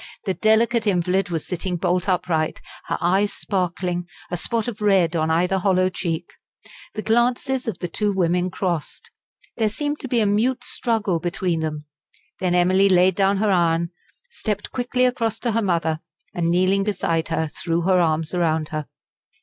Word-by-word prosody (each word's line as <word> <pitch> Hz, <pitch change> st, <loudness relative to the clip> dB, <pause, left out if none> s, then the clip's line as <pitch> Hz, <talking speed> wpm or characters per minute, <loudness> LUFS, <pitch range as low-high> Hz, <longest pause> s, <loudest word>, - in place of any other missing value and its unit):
The 190 Hz, -, 0 dB
delicate 225 Hz, +2 st, +2 dB
invalid 185 Hz, 0 st, +1 dB
was 165 Hz, -3 st, -2 dB
sitting 180 Hz, 0 st, -2 dB
bolt 180 Hz, +3 st, 0 dB
upright, 175 Hz, -4 st, 0 dB, 0.3 s
her -, -, -2 dB
eyes 190 Hz, +4 st, +2 dB
sparkling, 180 Hz, -2 st, -2 dB, 0.2 s
a -, -, 0 dB
spot 225 Hz, +6 st, -1 dB
of 225 Hz, -2 st, -5 dB
red 190 Hz, -5 st, +3 dB
on 160 Hz, -1 st, +1 dB
either 180 Hz, +4 st, +2 dB
hollow 185 Hz, -1 st, +2 dB
cheek. 170 Hz, -2 st, -3 dB, 0.7 s
The 215 Hz, -, -3 dB
glances 245 Hz, +3 st, +1 dB
of 215 Hz, -6 st, -2 dB
the 175 Hz, -, -4 dB
two 205 Hz, +4 st, -1 dB
women 180 Hz, -1 st, +1 dB
crossed; 175 Hz, -4 st, -3 dB, 0.5 s
there 220 Hz, -2 st, +2 dB
seemed 295 Hz, +6 st, -3 dB
to 270 Hz, -, -5 dB
be 245 Hz, -2 st, +1 dB
a 215 Hz, -, +3 dB
mute 240 Hz, +5 st, +1 dB
struggle 215 Hz, -10 st, 0 dB
between 175 Hz, 0 st, -1 dB
them. 155 Hz, -1 st, -4 dB, 0.5 s
Then 180 Hz, -1 st, +1 dB
Emily 185 Hz, +2 st, +4 dB
laid 185 Hz, 0 st, +5 dB
down 195 Hz, +1 st, +2 dB
her 210 Hz, +1 st, +2 dB
iron, 170 Hz, -1 st, +2 dB, 0.4 s
stepped 210 Hz, -, -4 dB
quickly 250 Hz, 0 st, 0 dB
across 235 Hz, -3 st, 0 dB
to 240 Hz, -, 0 dB
her 230 Hz, +1 st, +1 dB
mother, 165 Hz, -5 st, 0 dB, 0.3 s
and 170 Hz, -1 st, 0 dB
kneeling 185 Hz, +3 st, +3 dB
beside 175 Hz, -5 st, -1 dB
her, 160 Hz, -1 st, -1 dB
threw 165 Hz, +2 st, -2 dB
her 185 Hz, +1 st, +3 dB
arms 160 Hz, -1 st, 0 dB
around 160 Hz, -3 st, 0 dB
her. 155 Hz, -2 st, -4 dB
185 Hz, 170 wpm, -22 LUFS, 170-210 Hz, 0.7 s, laid